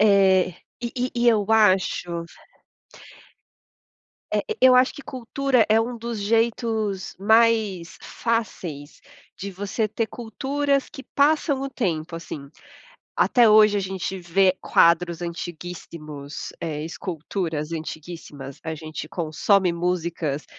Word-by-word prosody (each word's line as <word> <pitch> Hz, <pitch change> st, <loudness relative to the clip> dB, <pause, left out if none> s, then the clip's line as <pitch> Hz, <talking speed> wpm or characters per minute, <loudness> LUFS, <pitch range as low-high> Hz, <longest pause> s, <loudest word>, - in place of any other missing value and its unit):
É. 195 Hz, -3 st, +5 dB, 0.3 s
E 235 Hz, -1 st, -4 dB
e 250 Hz, 0 st, -1 dB
e 240 Hz, 0 st, +3 dB
eu 210 Hz, -3 st, +3 dB
acho 185 Hz, -5 st, +2 dB, 2.1 s
Eh, -, -, +2 dB, 0.2 s
e 260 Hz, -, +8 dB
eu 255 Hz, -, +7 dB
acho 255 Hz, +1 st, +5 dB
que 285 Hz, -, -10 dB
cultura 255 Hz, -1 st, +1 dB
é 220 Hz, +1 st, +5 dB
um 240 Hz, +1 st, -3 dB
dos 230 Hz, -2 st, -5 dB
jeitos 220 Hz, -2 st, 0 dB
mais 215 Hz, -5 st, +3 dB
fáceis 180 Hz, -11 st, -3 dB, 0.4 s
de 200 Hz, -, -5 dB
você 205 Hz, +4 st, -2 dB
ter 220 Hz, +2 st, -2 dB
culturas 275 Hz, +4 st, -1 dB
que 270 Hz, -3 st, -10 dB
passam 285 Hz, -1 st, +3 dB
o 275 Hz, -, -3 dB
tempo, 165 Hz, -8 st, -2 dB
assim. 145 Hz, -4 st, -8 dB, 0.7 s
Até 240 Hz, -4 st, +5 dB
hoje 215 Hz, -1 st, +6 dB
a 200 Hz, -, +1 dB
gente 190 Hz, 0 st, -4 dB
vê 185 Hz, +1 st, +2 dB
quadros 170 Hz, 0 st, +3 dB
antiguíssimos, 165 Hz, -4 st, -7 dB
eh, 155 Hz, -2 st, -3 dB
esculturas 165 Hz, -2 st, -4 dB
antiguíssimas, 155 Hz, -4 st, -7 dB
a 160 Hz, -, -3 dB
gente 155 Hz, 0 st, -7 dB
consome 175 Hz, +3 st, +1 dB
músicas 170 Hz, -4 st, -2 dB
195 Hz, 120 wpm, -24 LUFS, 170-230 Hz, 2.1 s, e